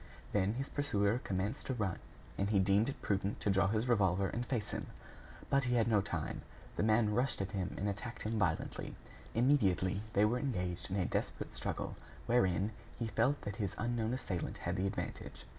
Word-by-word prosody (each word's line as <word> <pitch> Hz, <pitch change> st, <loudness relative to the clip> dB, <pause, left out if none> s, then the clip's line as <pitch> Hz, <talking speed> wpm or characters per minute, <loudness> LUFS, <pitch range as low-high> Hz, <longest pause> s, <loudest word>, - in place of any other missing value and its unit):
Then 100 Hz, +1 st, +2 dB
his 135 Hz, +2 st, -2 dB
pursuer 110 Hz, -6 st, +1 dB
commenced 95 Hz, -1 st, -2 dB
to 130 Hz, -, -1 dB
run; 100 Hz, -6 st, -1 dB, 0.4 s
and 100 Hz, +1 st, 0 dB
he 105 Hz, -, +3 dB
deemed 100 Hz, +5 st, +4 dB
it 140 Hz, -, -5 dB
prudent 100 Hz, 0 st, 0 dB
to 100 Hz, -, +3 dB
draw 95 Hz, 0 st, +4 dB
his 110 Hz, +4 st, +1 dB
revolver 95 Hz, -5 st, +3 dB
and 120 Hz, -, -2 dB
face 120 Hz, -4 st, -2 dB
him. -, -, -3 dB, 0.6 s
But 140 Hz, -1 st, +4 dB
he 125 Hz, 0 st, +2 dB
had 115 Hz, -1 st, +3 dB
no 105 Hz, -3 st, +4 dB
time. 90 Hz, -6 st, -3 dB, 0.3 s
The -, -, 0 dB
man 110 Hz, 0 st, +4 dB
rushed 125 Hz, +4 st, +1 dB
at 95 Hz, +1 st, -2 dB
him 95 Hz, -3 st, -2 dB
and 100 Hz, -, -1 dB
attacked 115 Hz, +4 st, -4 dB
him 110 Hz, 0 st, -1 dB
violently. 90 Hz, -5 st, -1 dB, 0.4 s
Immediately, 100 Hz, -7 st, +3 dB
they 100 Hz, +2 st, +5 dB
were 120 Hz, +4 st, +2 dB
engaged 90 Hz, -10 st, -2 dB
in 95 Hz, -, -2 dB
a 95 Hz, -3 st, +1 dB
desperate -, -, -2 dB
struggle, -, -, -3 dB, 0.3 s
wherein 100 Hz, -4 st, +3 dB, 0.3 s
he 115 Hz, -, -1 dB
felt 115 Hz, +6 st, +2 dB
that 100 Hz, -1 st, -5 dB
his 100 Hz, -4 st, -2 dB
unknown 115 Hz, 0 st, 0 dB
assailant 95 Hz, -9 st, -3 dB
had -, -, -2 dB
the 95 Hz, +1 st, +1 dB
advantage. -, -, -5 dB
105 Hz, 195 wpm, -35 LUFS, 95-120 Hz, 0.6 s, they